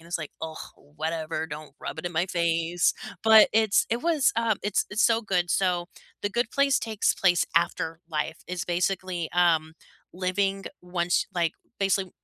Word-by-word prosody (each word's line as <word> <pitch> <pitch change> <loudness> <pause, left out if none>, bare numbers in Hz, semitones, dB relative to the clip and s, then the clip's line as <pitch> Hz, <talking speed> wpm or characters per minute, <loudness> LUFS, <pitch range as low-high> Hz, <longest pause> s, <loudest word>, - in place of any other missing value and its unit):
And 165 - -16
it's 170 - -2
like, 155 -3 -7
"Ugh, 160 -1 -5 0.2
whatever 160 +1 -4
don't 150 -2 -9
rub - - -6
it - - -19
in - - -3
my 170 +3 +1
face." 170 0 +1 0.3
But 220 -1 +8
it's 220 -1 +3
it 235 - +1
was 320 -5 +3
um, 230 -3 +1
it's 205 0 +1
it's 210 +3 +1
so 230 0 +3
good. 180 -5 0
So, 180 -2 +1 0.4
The 205 - -1
Good 235 +3 -1
Place 280 -2 +3
takes 220 -2 0
place 175 -3 +3
after 165 -1 0
life. 160 0 -3
It's 180 -1 -3
basically, 180 -1 -1
um, 165 -3 +2 0.4
living 195 +2 -1 0.2
once 180 0 0
like, 170 -2 +1 0.3
basically 195 -1 +1
180 Hz, 170 wpm, -26 LUFS, 165-205 Hz, 0.4 s, But